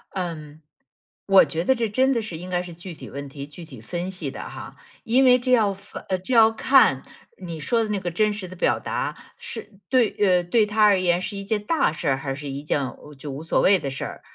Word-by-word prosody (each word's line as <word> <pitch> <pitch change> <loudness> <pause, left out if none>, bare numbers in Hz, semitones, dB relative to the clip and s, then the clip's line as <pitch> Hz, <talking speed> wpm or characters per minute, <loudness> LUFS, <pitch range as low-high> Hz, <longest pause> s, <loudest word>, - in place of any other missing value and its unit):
嗯， 160 -5 -5 0.7
我 195 -1 +7
觉 165 +1 -3
得 265 - +3
这 230 -3 -1
真 260 +5 +2
的 235 - 0
是 210 -7 -6
应 180 +3 -8
该 180 -1 0
是 180 -1 -9
具 175 +2 -9
体 155 - -11
问 140 +1 -7
题 140 0 -8
具 155 +4 -11
体 130 -8 -12
分 175 +9 -4
析 165 -7 -5
的 - - -7
哈， - - -9 0.3
因 250 +4 +3
为 250 -1 +7
这 255 +1 -2
要 215 -5 +4
发 195 - -11 0.2
这 255 - -2
要 225 -1 +7
看 225 - +4 0.4
你 170 -4 -7
说 230 +10 +1
的 215 - -4
那 205 -1 -1
个 180 -2 -3
真 210 +5 +1
实 205 -3 -6
的 185 - -10
表 180 - +1
达， - - -3 0.2
是 215 -3 -8
对 250 -4 +4
呃， 185 -3 +3
对 215 +5 +3
他 210 +1 +1
而 205 -2 +5
言 175 -1 +2
是 200 +2 -4
一 200 - -5
件 210 +1 -2
大 315 - +1
事 160 0 -5
儿， 135 - +2
还 135 0 -4
是 145 0 -7
一 140 +1 -5
件 150 -1 0 0.4
就 140 +1 -7
无 140 +3 -7
所 165 - +1
谓 195 0 +5
的 140 - -4
事 135 - -5
儿。 - - -8
185 Hz, 265 characters per minute, -23 LUFS, 160-220 Hz, 0.7 s, 我